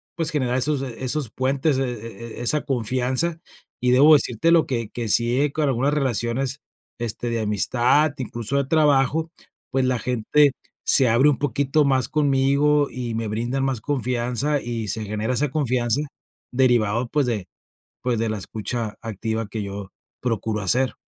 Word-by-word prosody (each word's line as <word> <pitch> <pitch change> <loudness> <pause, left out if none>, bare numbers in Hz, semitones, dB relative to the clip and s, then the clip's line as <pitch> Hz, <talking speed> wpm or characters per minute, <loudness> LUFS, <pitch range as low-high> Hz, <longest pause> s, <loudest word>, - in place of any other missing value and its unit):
pues 165 -1 -1
generar 130 -4 0
esos, 135 +1 +1
eh, 125 -4 -6
esos 130 -2 -1
puentes 135 +2 0
e - - +1
e 115 -2 -6
e - - -5
esa 150 +5 +1
confianza 130 +6 0 0.4
y 125 0 +2
debo 145 +5 +7
decirtelo 160 +5 +2
que 115 -5 -2
que 120 -2 -4
si 120 +4 +2
he, 145 - +1
con 155 - -1
algunas 135 +3 +1
relaciones, 130 0 -1 0.4
este, 120 +1 -3
de 115 - -1
amistad, 120 +8 +2
incluso 120 0 -3
de 140 - +1
trabajo, 150 +1 +2 0.4
pues 130 0 +1
la 125 -2 +1
gente 125 +5 +2 0.3
se 130 - +5
abre 130 +6 +5
un 135 - +1
poquito 145 +1 +1
más 130 -3 +1
conmigo 145 0 +2
y 120 -2 -4
me 115 0 -2
brindan 120 +5 -2
más 130 -4 -1
confianza 125 +2 -1
y 115 -3 -4
se 110 +2 -3
genera 110 +4 -2
esa 145 +2 +1
confianza 125 -3 0 0.5
derivado 120 -2 +2
pues 145 0 +1
de 105 -6 -2 0.5
pues 125 -2 0
de 115 -1 0
la 110 - -2
escucha 110 +2 -4
activa 110 0 -3
que 110 0 -5
yo 100 -1 -7 0.3
procuro 110 -3 -1
hacer. 125 +7 +1
125 Hz, 165 wpm, -23 LUFS, 115-140 Hz, 0.5 s, debo